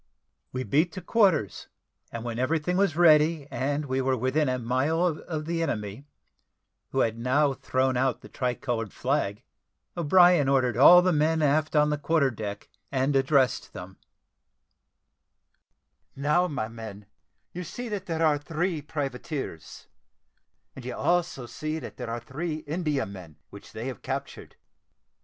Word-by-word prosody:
We 130 0 -3
beat 155 +7 +1
to 185 - -6
quarters, 180 - +2 0.4
and 115 -1 -6
when 120 -1 -4
everything 155 +6 0
was 195 -5 +2
ready, 155 -3 +4
and 145 +3 -1
we 130 -1 -1
were 130 0 +1
within 130 +4 +1
a 130 - 0
mile 130 +8 0
of 155 -2 -3
the 165 +1 -2
enemy, 110 -3 -4 0.8
who - - 0
had 115 0 0
now 135 +4 +2
thrown 130 0 0
out 130 +1 0
the - - -12
tricoloured 120 -3 -3
flag, 125 -5 -1 0.5
O'Brien 175 -3 +5
ordered 130 -3 +2
all 175 +8 +8
the 185 -1 +2
men 155 +1 +2
aft 155 +2 +1
on 150 0 +4
the 150 - -1
quarter 145 -3 +2
deck, 105 -3 -6 0.2
and 135 +1 +1
addressed 135 -1 +2
them: 95 +2 -9 2.2
"Now, 150 +6 +2
my 140 -9 -3
men, 110 -3 -9 0.5
you 180 - -5
see 240 +8 -6
that 205 -2 -4
there 165 -1 0
are 150 -2 +3
three 165 +3 -2
privateers, 140 - -5 0.9
and 135 - -9
you 125 - -5
also 175 -7 0
see 155 +6 -4
that - - -8
there 125 -2 -5
are 115 +1 -3
three 155 +6 -5
Indiamen, 135 - -3 0.2
which 100 - -12
they 115 - -6
have 130 -5 -6
captured. - - -6
140 Hz, 145 wpm, -27 LUFS, 125-160 Hz, 2.2 s, all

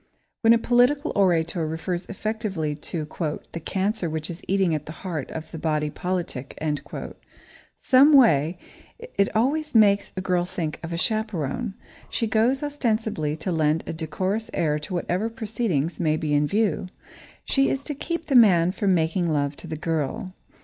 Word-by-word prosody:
When 225 - +5
a 230 - +7
political 250 +6 +3
orator 170 -4 +2
refers 175 +3 -3
effectively 210 -7 -3
to 155 +2 -5 0.5
"the 170 - -5
cancer 190 +2 -1
which 155 +2 -3
is 170 - -8
eating 190 -3 +2
at 150 -1 -3
the - - -5
heart 160 -7 -3
of 160 0 -7
the 165 - -6
body 150 -1 0
politic," 175 -8 -4 1.2
someway, 255 - +5 0.4
it 465 - -1
always 290 +5 +1
makes 205 -2 +5
a - - +1
girl 180 -1 +1
think 165 -3 -4
of 165 - -6
a 170 - -2
chaperone. 215 - -1 0.3
She 230 - -1
goes, 225 +5 +2
ostensibly, 220 - -1
to 160 +4 -4
lend 155 -1 +1
a - - -4
decorous 185 +7 -2
air 150 -2 +1
to 150 +5 -7
whatever 180 +5 -1
proceedings 215 - -2
may 155 -3 +2
be 150 -1 -1
in 145 0 +3
view. 200 -2 0 0.6
She 275 -1 +2
is 275 - -2
to 295 - -3
keep 330 +3 -4
the 280 - -2
man 180 -7 +6
from 195 -1 +1
making 165 +1 +1
love 145 -1 0
to - - -9
the 155 - -4
girl. 165 - -2
185 Hz, 165 wpm, -24 LUFS, 160-225 Hz, 1.2 s, a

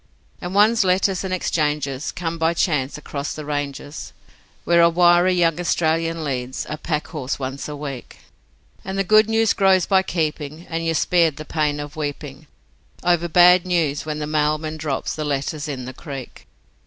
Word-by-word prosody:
And 180 +2 -5
one's 215 +2 +5
letters 185 0 +1
and 190 - -4
exchanges 150 -6 -1
come 170 -1 -4
by 165 +1 +1
chance 150 -5 0
across 145 -1 -5
the 155 - -7
ranges, 145 0 -5 0.5
Where 170 0 +4
a 170 - +6
wiry 175 +1 +4
young 170 -2 +2
Australian 165 -1 0
leads 130 -2 -3
a 150 - -4
pack 155 -2 -2
horse 140 -5 -4
once 135 0 -5
a 150 - -5
week, 140 -4 -7 0.7
And 190 +1 -5
the 195 - +2
good 215 +2 +4
news 225 -1 +3
grows 190 -3 +3
by 190 -1 +3
keeping, 155 -2 -3
and 165 0 -3
you're 165 0 0
spared 165 -2 +2
the 155 - -8
pain 150 -2 -1
of 145 0 -7
weeping 145 -1 -6 0.6
Over 175 -1 +2
bad 180 +1 +6
news 165 -6 0
when 155 -1 -4
the 150 - -3
mailman 155 +1 -1
drops 150 -3 -3
the 155 - -3
letters 145 +1 -2
in 130 -4 -5
the 130 - -7
creek. 135 -2 -9
155 Hz, 175 wpm, -21 LUFS, 145-175 Hz, 0.7 s, a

